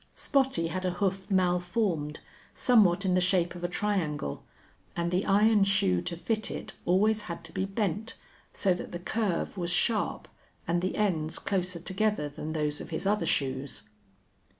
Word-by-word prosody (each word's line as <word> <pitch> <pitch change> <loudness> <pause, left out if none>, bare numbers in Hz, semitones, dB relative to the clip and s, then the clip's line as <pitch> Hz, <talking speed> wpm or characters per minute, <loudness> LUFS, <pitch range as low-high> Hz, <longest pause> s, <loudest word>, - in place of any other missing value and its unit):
Spottie 265 - +1
had 185 +2 -3
a 185 - +1
hoof 190 +1 -1
malformed, 175 -4 0 0.3
somewhat 200 -6 +4
in 185 - +2
the 180 - +3
shape 180 -1 +2
of 175 -1 -9
a - - +1
triangle, 175 - -2 0.5
and 170 0 -1
the 180 +2 0
iron 210 +1 +5
shoe 140 - +2
to 170 - -5
fit 220 +4 -2
it - - -6
always 210 +4 +3
had 170 0 -5
to 160 - -9
be 190 - -1
bent, 205 +3 -2 0.4
so 190 -2 +1
that 175 - -7
the - - -2
curve 195 0 -1
was 175 -1 -1
sharp 210 +4 +1 0.4
and 175 +1 +1
the 185 - -1
ends 165 -7 0
closer 185 -3 -1
together 190 -2 0
than 150 +2 -6
those 150 -2 -1
of - - -8
his 165 +3 -4
other 200 -4 +1
shoes. 135 -5 -1
180 Hz, 170 wpm, -29 LUFS, 170-205 Hz, 0.5 s, iron